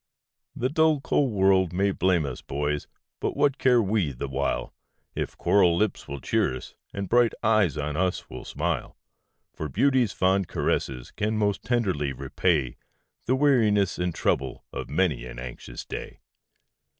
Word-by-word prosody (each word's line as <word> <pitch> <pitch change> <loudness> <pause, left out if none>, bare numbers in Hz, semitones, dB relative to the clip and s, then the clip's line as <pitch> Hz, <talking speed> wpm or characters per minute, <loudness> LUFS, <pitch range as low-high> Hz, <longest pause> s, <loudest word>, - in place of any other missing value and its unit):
The 125 - 0
dull, 160 0 +3
cold 135 -1 +1
world 95 -3 +3
may 100 +2 +2
blame 90 -4 +2
us, 65 -3 -5
boys! 75 +1 -2 0.3
but - - -2
what 140 -1 +2
care 125 -2 +5
we 100 -6 +1
the 65 +3 -5
while, 65 +1 -2 0.4
If - - -4
coral 90 -4 +4
lips 105 0 -1
will 70 0 -5
cheer - - 0
us, - - -11 0.2
and 100 -1 -4
bright 120 +2 +4
eyes 110 - +3
on 75 +1 -2
us 90 +2 0 0.2
smile? - - -3 0.6
For 75 - -5
beauty's 130 - +2
fond 95 0 +1
caresses 65 -2 -2
can 110 +1 -1
most 100 -2 +1
tenderly 95 - 0
repay 70 +1 0 0.5
The 130 - +3
weariness 110 -10 +3
and 90 0 0
trouble - - -1
of - - -5
many 75 -6 0
an - - -9
anxious - - -8
day. - - -7
95 Hz, 150 wpm, -26 LUFS, 75-110 Hz, 0.6 s, care